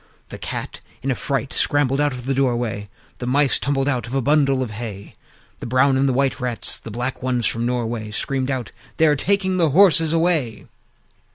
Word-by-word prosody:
The - - -9
Cat - - -6 0.2
in 135 - 0
a - - 0
fright 135 +2 -3
scrambled 145 -1 +2
out 145 0 +2
of 125 -2 -7
the 135 - 0
doorway; 120 -6 -1 0.3
The 125 - -4
Mice 140 +2 +2
tumbled 135 -1 0
out 125 -5 -1
of 125 - -5
a - - +2
bundle 140 -1 +2
of 115 - -6
hay; 105 -2 -7 0.5
The - - -6
brown 130 +3 +3
and 135 +1 +2
white 135 0 +1
Rats, 125 -3 0
and - - -26
the - - -6
black 125 +2 -3
ones 125 -2 0
from 115 +1 0
Norway, 115 -3 -2
Screamed 135 +4 -2
out, 130 -4 -3 0.3
"They 160 - +4
are 150 -2 +4
taking 190 +4 +1
the 165 -3 +3
horses 165 -1 +5
away!" 160 -9 0
130 Hz, 200 wpm, -21 LUFS, 120-145 Hz, 0.5 s, horses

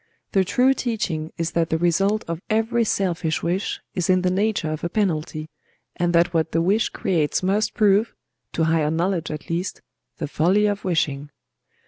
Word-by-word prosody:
The 195 - +3
true 250 +8 +3
teaching 185 -12 -2
is 165 0 -2
that 165 -1 0
the 160 - +1
result 195 +5 +1
of 165 0 -4
every 225 +2 +2
selfish 175 -6 -1
wish 180 +4 -1
is 180 -2 -2
in 185 0 +3
the 180 - +2
nature 195 -4 0
of 155 - -5
a 170 - -1
penalty, 160 -6 -1 0.5
and 175 0 0
that 170 +1 +3
what 160 -1 0
the 165 - +2
wish 205 +5 +2
creates 165 -2 0
must 200 +4 +1
prove—to 205 -5 0
higher 160 -2 +2
knowledge 170 +1 -1
at 150 -1 -6
least—the 170 -3 -6
folly 180 +8 +2
of 205 -1 -1
wishing." 145 -5 -1
175 Hz, 165 wpm, -23 LUFS, 160-200 Hz, 0.5 s, The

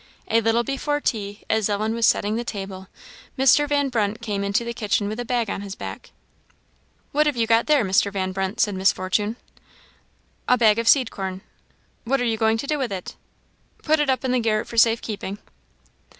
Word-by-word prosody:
A 230 +1 +3
little 225 +1 +2
before 285 +3 -2
tea, 205 -6 -3
as 220 -2 +1
Ellen 215 +2 -1
was 230 -1 +2
setting 210 +1 +1
the 235 - -2
table, 195 -4 -6 0.5
Mr. 270 +3 +4
Van 285 -1 +1
Brunt 220 -3 -1
came 205 -4 -3
into 200 +4 0
the 235 - -4
kitchen 210 -3 -1
with 215 +3 -4
a 245 - -3
bag 240 -2 0
on 195 - -4
his 200 -1 -7
back. - - -8 1.0
"What 300 +1 +2
have 290 -4 0
you 230 - +2
got 230 +1 +3
there, 295 -7 +3
Mr. 195 +1 +2
Van 190 -1 -2
Brunt?" 190 +2 -3
said 205 - +2
Miss 190 +1 +3
Fortune. 205 +4 -1 1.1
"A 250 - +4
bag 220 -2 +4
of 230 - -2
seed 255 -3 +5
corn." 190 -1 -5 0.6
"What 270 +3 0
are 245 - 0
you 225 -2 0
going 220 0 +2
to 225 - -4
do 300 +1 -1
with 255 -5 -2
it?" 185 -2 -6 0.7
"Put 310 0 +2
it 295 -2 +1
up 265 0 0
in 255 - 0
the 255 - +2
garret 215 -2 0
for - - -9
safe 230 0 +4
keeping." 205 -2 -5
225 Hz, 205 wpm, -23 LUFS, 200-245 Hz, 1.1 s, seed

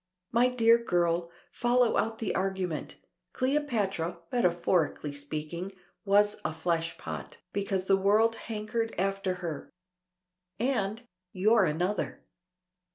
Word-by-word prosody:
My 240 +2 +4
dear 235 -1 +4
girl, 170 -3 +1 0.2
follow 245 -1 +2
out 225 0 0
the 220 - -2
argument. 185 -4 -2 0.4
Cleopatra, 225 - 0
metaphorically 175 -8 +1
speaking, 155 +6 -5 0.3
was 205 +1 +4
a - - -1
fleshpot, 165 +1 -3 0.2
because 195 -2 -1
the 195 0 +4
world 215 +4 +3
hankered 225 +1 -3
after 195 0 0
her. 155 -4 -5 0.9
And 230 -3 0 0.3
you're 210 +2 +4
another." 175 +6 -1
195 Hz, 100 wpm, -29 LUFS, 175-225 Hz, 0.9 s, My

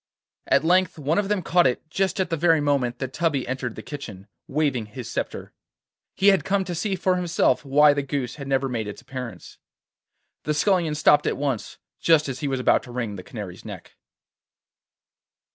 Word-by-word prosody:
At - - +3
length 180 +1 +2
one 155 +5 0
of 200 -1 -1
them 205 -3 0
caught 175 -3 +4
it 125 +5 -2
just 195 +2 0
at 190 - -1
the - - +2
very 165 0 +3
moment 140 -4 0
that 130 0 -5
Tubby 155 -5 0
entered 130 -2 -3
the - - -8
kitchen, 110 -10 -8 0.2
waving 135 -6 0
his 120 +3 -8
sceptre. - - -5 0.6
He 195 +1 +5
had 195 -1 +3
come 195 0 +1
to 180 - -5
see 190 +4 -1
for 185 0 +1
himself 175 -3 +1
why 145 +1 +5
the 145 - -1
goose 135 -2 -3
had 140 -2 -7
never 135 0 +1
made 115 -4 -3
its 105 - -8
appearance. 130 -3 -8 0.8
The 150 - -1
Scullion 170 -2 +2
stopped 150 0 +4
at - - 0
once, 135 -5 -3 0.2
just 160 -3 +4
as 130 -1 -4
he 145 - -2
was 135 -1 -1
about 125 - +3
to 125 - -12
wring 120 -4 -3
the 95 - -7
Canary's 100 -2 -8
neck. - - -10
145 Hz, 195 wpm, -24 LUFS, 125-170 Hz, 0.8 s, He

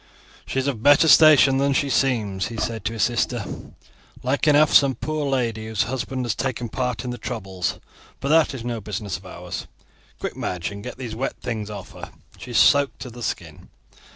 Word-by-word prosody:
"She - - -4
is 135 - +1
of 135 -6 -2
better 145 +4 +6
station 150 -4 +7
than 140 0 +2
she 140 +1 +1
seems," 110 -9 0
he 115 0 -7
said 115 0 -3
to 115 - -1
his 110 -2 0
sister; 120 -2 0 0.8
"like 135 +4 0
enough 150 0 +5
some 140 -2 +6
poor 155 -1 -3
lady 115 -5 -1
whose 110 -3 0
husband 130 0 -3
has 120 - 0
taken 120 -3 -3
part 125 0 -2
in 125 - -4
the 120 - -6
troubles; 95 -3 -4 0.4
but 140 - -3
that 155 -2 +4
is 120 -2 -7
no 120 -2 -3
business 105 -2 -4
of - - -14
ours. - - -7 0.5
Quick, - - -4
Madge, 90 0 -3
and 100 0 -8
get - - -7
these 120 -4 -6
wet 135 +3 -3
things 110 -3 -4
off 100 -3 -8
her; - - -9 0.3
she - - -9
is 120 - -1
soaked 140 -1 +4
to 125 - -7
the 120 +1 -11
skin. 110 - -5
125 Hz, 205 wpm, -23 LUFS, 110-135 Hz, 0.8 s, station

